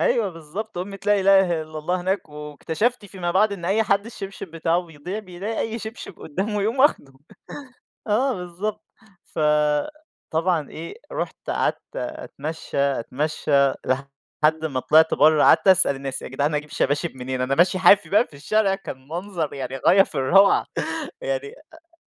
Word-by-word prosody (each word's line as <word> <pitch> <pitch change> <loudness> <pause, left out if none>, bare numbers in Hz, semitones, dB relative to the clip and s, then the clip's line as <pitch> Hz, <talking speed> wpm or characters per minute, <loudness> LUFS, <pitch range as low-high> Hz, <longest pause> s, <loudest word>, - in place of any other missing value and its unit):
أيوه 215 -5 +2
بالضبط، 175 +6 -7
أُمّة 195 +2 -5
لا 205 -1 +4
إله 190 -4 +4
إلّا 155 0 -8
الله 180 +4 -1
هناك 190 0 -2
واكتَشَفت 155 - -3
فيما 180 -3 -4
بعد 205 +4 +3
إن 185 -4 -6
أي 200 +5 +2
حد 200 -1 +1
الشبشب 195 -4 -8
بتاعُه 165 +1 0
بيضيع 165 +5 -6
بيلاقي 200 +2 -6
أي 225 +1 -2
شبشب 220 -4 -8
قُدّامُه 200 +6 -2
يقوم 225 +6 -1
واخده. 260 - +3 0.9
آه 245 +5 +2
بالضبط. 195 +4 -5 0.4
فطبعًا 155 - -1
إيه، 165 +2 -8 0.2
رُحت - - -3
قَعَدت - - 0 0.2
أتمشى، 165 - -6
أتمشى 140 +3 -1 0.4
لحد 140 +4 -1
ما 135 -5 -1
طلعت 160 +4 +4
برّه 155 0 +5
قَعَدت - - +5
أسأل 175 -7 +5
الناس: 135 -1 -5
"يا - - -6
جدعان 145 +4 -1
أجيب 150 0 -3
شباشب 145 +1 -1
منين؟" 130 0 -4
أنا 130 +2 +1
ماشي 175 +4 +3
حافي 195 +2 +6
بقى 210 +4 +3
في 145 - -16
الشارع 195 +6 +1
كان 135 -9 -9
منظر 170 -2 -4
يعني 135 -1 -5
غاية 195 +1 +7
في - - -11
الروعة، 195 +10 +4 0.6
يعني - - -2 0.2
أ 330 +1 -19
175 Hz, 155 wpm, -23 LUFS, 150-205 Hz, 0.9 s, غاية